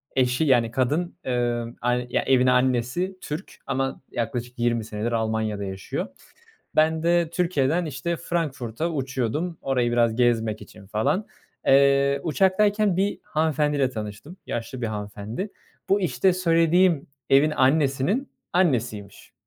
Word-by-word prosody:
eşi 130 +2 +2
yani 120 -6 +3
kadın, 145 +8 0
emm, 120 -1 -1
ay 125 0 0 0.2
evin 130 -1 +4
annesi 125 +8 +1
Türk 155 +6 -6
ama 135 0 -2
yaklaşık 120 +1 -4
20 120 -1 +1
senedir 110 +2 -3
Almanya'da 110 -2 -1
yaşıyor. 100 - -4 0.7
Ben 160 +1 +3
de 170 -1 +2
Türkiye'den 170 -2 +1
işte 155 +3 -3
Frankfurt'a 155 -3 -2
uçuyordum 140 +4 -2
orayı 125 -3 0
biraz 120 -2 +2
gezmek 115 -3 +1
için 100 -2 -13
falan. 110 - 0 0.4
Eee, 140 0 +4
uçaktayken 195 +3 +2
bir 200 +2 0
hanımefendiyle 150 -3 +1
tanıştım. 110 - -7
Yaşlı 120 +2 -4
bir 115 - -1
hanımefendi. 105 - -5 0.4
Bu 200 +1 +3
işte 180 +3 +2
söylediğim 170 -2 +3 0.2
evin 140 +3 +5
annesinin 145 - +2 0.2
annesiymiş. 120 - -1
135 Hz, 120 wpm, -24 LUFS, 120-165 Hz, 0.7 s, evin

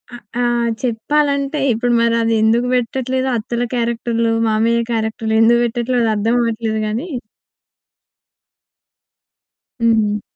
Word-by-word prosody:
ఆహ్, 240 - -13 0.2
ఆహ్, 240 -1 +1
చెప్పాలంటే 280 +4 0
ఇప్పుడు 240 +2 0
మరది 230 -1 +2
ఎందుకు 235 +3 +2
పెట్టట్లేదో 260 +2 -1
అత్తల 235 +2 -3
క్యారెక్టర్‌లు, 230 -1 0 0.2
మామయ్య 230 +2 +2
క్యారెక్టర్‌లు 220 0 -2
ఎందుకు 235 +1 +4
పెట్టట్లేదో 240 +1 0
అది 220 - +1
అర్థం 225 +3 +1
అవ్వట్లేదు 225 -1 -1
గాని 230 +10 -3 2.7
హుహు. 220 -3 +2
235 Hz, 105 wpm, -18 LUFS, 225-245 Hz, 2.7 s, ఎందుకు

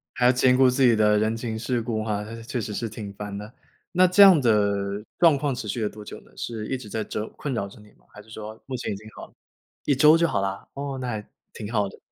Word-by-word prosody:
还 125 - +2
要 125 - +6
兼 125 0 +4
顾 130 -1 +6
自 125 +2 +1
己 120 -3 +5
的 105 -1 +4
人 110 +1 0
情 115 -1 -4
世 120 +2 -1
故 110 -1 -2
哈， 105 -2 -2
那 115 - -8
是 115 - -9
确 120 +2 -4
实 105 -1 -5
是 115 - -3
挺 105 -2 -8
烦 100 0 -6
的。 105 +2 -8 0.4
那 185 +1 +5
这 185 +3 +6
样 190 -6 +8
的 100 -3 +1 0.2
状 165 -4 +6
况 140 -1 -1
持 115 - -6
续 115 +3 -2
了 105 - +1
多 105 0 -11
久 - - -9
呢？ - - -22
是 110 -2 -5
一 135 - -1
直 125 -4 -10
在 110 - -2
折 105 +1 -4
困 140 -3 -4
扰 100 -4 -2
着 100 - -15
你 105 - -17
吗？ - - -30
还 105 - -12
是 110 - -24
说 110 0 -8
目 130 - -4
前 120 - -4
已 - - -4
经 110 +2 -13
好 - - -8
了？ - - -26 0.5
1 145 - +2
周 150 +4 +6
就 170 - +3
好 - - 0
啦？ 95 0 -4
哦， 140 -1 -4
那 125 - -4
还 110 -3 -5 0.2
挺 105 - -7
好 105 -3 +1
的。 - - -14
110 Hz, 300 characters per minute, -25 LUFS, 105-130 Hz, 0.5 s, 样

